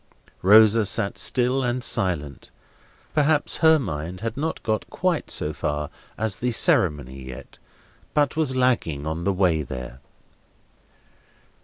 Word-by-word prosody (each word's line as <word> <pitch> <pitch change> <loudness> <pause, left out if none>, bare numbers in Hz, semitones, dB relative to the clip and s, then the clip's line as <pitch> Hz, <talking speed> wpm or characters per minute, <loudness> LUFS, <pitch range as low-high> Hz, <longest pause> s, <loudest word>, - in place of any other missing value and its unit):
Rosa 110 +3 +6
sat 100 0 -1
still 125 +2 +1
and 125 0 -2
silent. 75 - 0 0.6
Perhaps 150 0 +1
her 160 -1 +5
mind 90 - -5
had 115 0 -4
not 155 +4 -4
got 110 -2 -2
quite 180 -4 -2
so - - -1
far 75 0 -3 0.3
as 110 -2 0
the 125 - -1
ceremony 70 - +1
yet, 65 -1 -11 0.6
but 145 -1 +1
was 155 -5 0
lagging 115 - 0
on 80 +2 -4
the 100 - +1
way 90 -4 +1
there. 65 -2 -8
105 Hz, 130 wpm, -23 LUFS, -, 0.6 s, Rosa